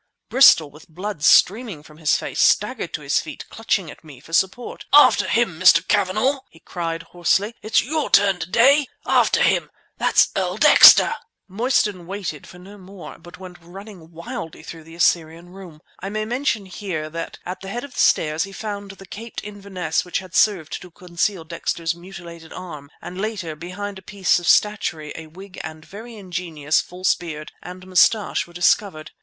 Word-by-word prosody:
Bristol, 255 - +6
with 150 +3 -17
blood 180 0 -6
streaming 200 -2 +3
from 155 0 -17
his 155 -2 +2
face, - - -6
staggered - - +1
to - - -8
his - - +1
feet, - - -8
clutching - - -2
at - - -16
me 145 -5 -14
for 165 +5 -16
support. 190 +8 -1
"After 295 - +6
him, 225 -9 0
Mr. 180 -1 +5
Cavanagh!" 215 +8 +1
he 165 - -20
cried 165 -2 -5
hoarsely. 195 +5 0
"It's 215 +1 +1
your 310 +4 -2
turn 195 -2 +3
to 170 - -6
day! 275 +7 +4 0.2
After - - +2
him! - - +1 0.3
That's - - +3
Earl 185 0 -2
Dexter!" 300 +6 +8 0.3
Mostyn 205 -4 -1
waited 190 -6 -6
for 180 - -14
no 195 +3 -14
more, 180 -6 -12
but 175 +1 -14
went 180 -2 -12
running 180 -1 -13
quickly 165 -1 -8
through 165 -2 -11
the 165 +1 -13
Assyrian 170 0 0
Room. 180 -5 -13 0.2
I 195 - -6
may 215 +1 -3
mention 235 -3 -2
here 185 -5 -5
that 165 +1 -6
at 185 +1 -6
the 195 - -8
head 240 +5 -5
of 285 -2 -10
the - - -7
stairs 155 +1 +2
he 195 - -8
found 205 -1 -6
the 195 0 -12
caped 225 +5 -9
Inverness 195 -5 -4
which 180 - -3
had 185 -2 -9
served 190 -8 +1
to 180 - -12
conceal 175 +1 -3
Dexter's 165 0 -3
mutilated 170 -2 -12
arm, 150 -6 -9
and 180 +2 -7
later, 200 -7 -4
behind 190 +5 -7
a - - -17
piece 190 -2 0
of 175 - -7
statuary, 170 -7 +1
a 160 -1 -9
wig 185 +4 -11
and 155 -1 -9
a - - -20
very 225 +4 -11
ingenious 175 -6 -2
false 180 +1 -1
beard 155 -3 -8
and 180 +1 -10
moustache 185 +3 +2
were 175 - -18
discovered. 175 -2 0
185 Hz, 185 wpm, -21 LUFS, 165-205 Hz, 0.3 s, Dexter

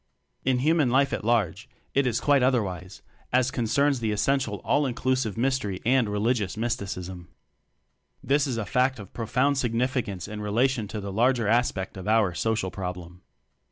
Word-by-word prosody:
In 130 -1 +2
human 150 +1 +2
life 135 +2 +2
at - - -2
large, 110 -1 0 0.2
it 135 -1 +2
is 115 -2 0
quite 145 -2 +3
other 125 -2 +3
wise 95 0 -8 0.3
as 130 0 +2
concerns 135 +4 +1
the 110 -2 -1
essential 115 +1 0
All 145 -1 +2
inclusive 125 -3 -1
Mystery 120 -6 0
and 125 -2 +3
religious 105 -1 0
mys 120 +1 0
ticism. 90 -4 -7 1.0
This 145 +1 +2
is 125 -4 -2
a 110 - -2
fact 130 +6 +1
of 100 -3 -11
profound 125 +5 +1
significance 120 -6 -1
in 105 0 -6
relation 115 +2 +1
to 105 +1 -5
the 100 -1 -5
larger 120 +1 +2
aspect 105 -5 0
of 95 - -7
our 110 -4 +3
"Social 110 -1 -1
Problem." 90 -1 -6
115 Hz, 165 wpm, -26 LUFS, 100-130 Hz, 1.0 s, quite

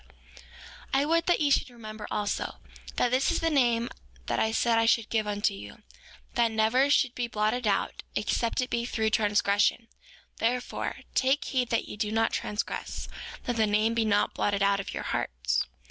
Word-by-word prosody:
5:11 60 - -26 0.9
And 270 - +4
I - - -1
would 335 +2 +2
that 350 - +3
ye 290 -2 +2
should 275 - +2
remember 215 -3 -9
also, 205 -1 -2 0.4
that 245 - +1
this 260 +2 +2
is - - 0
the 330 0 +1
name 240 -5 +2 0.4
that - - -1
I 220 - +2
said 230 0 +2
I 225 - +2
should 230 -1 +2
give 220 -2 +1
unto 205 0 0
you 105 - -10 0.5
that 235 -2 +3
never 225 +5 +2
should 270 -3 +3
be 245 -1 -2
blotted 220 +2 0
out, 200 - 0
except 230 +3 0
it 250 - -4
be 235 - 0
through 220 -2 -1
transgression; 205 +2 +2 0.5
therefore, 245 +2 -2
take 265 +3 +2
heed 250 -3 0
that 230 - 0
ye - - -8
do 210 0 -1
not 225 +1 +1
transgress, 210 +1 -3 0.3
that 245 -1 -2
the 220 -1 +3
name 215 +2 +2
be 230 -1 +1
not 205 -1 +2
blotted 200 -1 0
out 200 0 +3
of 195 - -5
your - - -4
hearts. - - -1
225 Hz, 190 wpm, -28 LUFS, 210-245 Hz, 0.9 s, And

